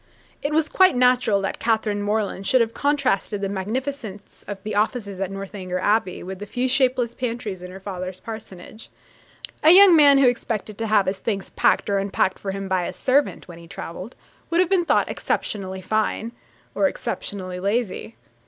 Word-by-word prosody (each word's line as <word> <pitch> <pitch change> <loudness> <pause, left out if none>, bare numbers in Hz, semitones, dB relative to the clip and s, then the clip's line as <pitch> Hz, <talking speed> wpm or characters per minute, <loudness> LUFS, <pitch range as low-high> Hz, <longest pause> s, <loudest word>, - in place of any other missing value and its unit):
It 290 - -2
was 310 0 +2
quite 375 -4 +4
natural 250 -5 +3
that 195 - -3
Catherine 220 -2 0
Morland 205 -2 -2
should 255 - +4
have 230 -1 +1
contrasted 280 -8 0
the 200 - -2
magnificence 210 +1 -5
of 205 - -5
the 215 - -4
offices 205 -2 -1
at 195 -1 -2
Northanger 195 -2 -5
Abbey 200 0 0
with 190 +1 -7
the 205 - -7
few 250 +4 -1
shapeless 255 -2 +2
pantries 230 -6 -4
in 180 - -8
her 190 +1 -10
father's 185 -1 -6
parsonage. 220 -1 -10 0.7
A 310 - +6
young 370 0 +9
man 285 -3 +7
who 275 -2 +5
expected 225 -3 -2
to 225 - -2
have 210 -2 +3
his 190 +1 -2
things 200 -3 -3
packed - - +2
or 200 -1 +1
unpacked 195 -1 0
for 200 - -5
him 195 0 -4
by 185 -2 0
a - - -5
servant, 275 +2 0
when 170 -2 -11
he 170 - -13
travelled, 185 +7 -8 0.3
would 335 - +1
have 365 -1 +3
been 365 -3 +3
thought - - +2
exceptionally 190 -2 -3
fine, 220 +3 -1 0.4
or - - +2
exceptionally 185 -2 -5
lazy. 200 - -2
210 Hz, 180 wpm, -23 LUFS, 190-250 Hz, 0.7 s, young